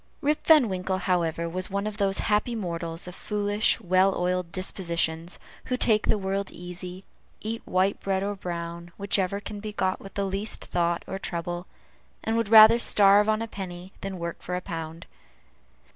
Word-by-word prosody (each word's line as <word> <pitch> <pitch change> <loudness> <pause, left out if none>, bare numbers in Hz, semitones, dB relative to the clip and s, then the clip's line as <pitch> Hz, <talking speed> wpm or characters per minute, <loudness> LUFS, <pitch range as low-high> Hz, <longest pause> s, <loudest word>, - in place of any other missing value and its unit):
Rip 300 0 0
Van 305 -7 +7
Winkle, 185 -1 -2
however, 170 -3 0
was 185 +2 -3
one 200 +1 -2
of 215 -1 -4
those 195 -2 +1
happy 210 +3 +1
mortals, 170 -4 -3
of 180 - -7
foolish, 205 +2 0
well 185 +2 +3
oiled 180 -1 -1
dispositions, 170 -3 -2 0.3
who 250 - -1
take 215 -3 +3
the - - +3
world 195 0 -2
easy, 180 +1 -8 0.4
eat 225 +1 -4
white 185 +2 +1
bread 195 -1 -1
or 205 +1 -1
brown, 170 -2 -6
whichever 200 -1 0
can 205 0 -7
be 210 0 -6
got 190 -2 0
with 195 - -11
least 200 +2 -2
thought 170 -1 0
or 190 - -5
trouble, 175 0 -4 0.6
and 225 - 0
would 230 -2 0
rather 220 +1 +9
starve 205 -1 +5
on 215 +1 +1
a - - -5
penny 185 -2 -8
than 195 -1 -5
work 170 -1 -5
for 180 - -4
a - - -1
pound. 165 -1 -6
190 Hz, 175 wpm, -26 LUFS, 175-205 Hz, 0.6 s, rather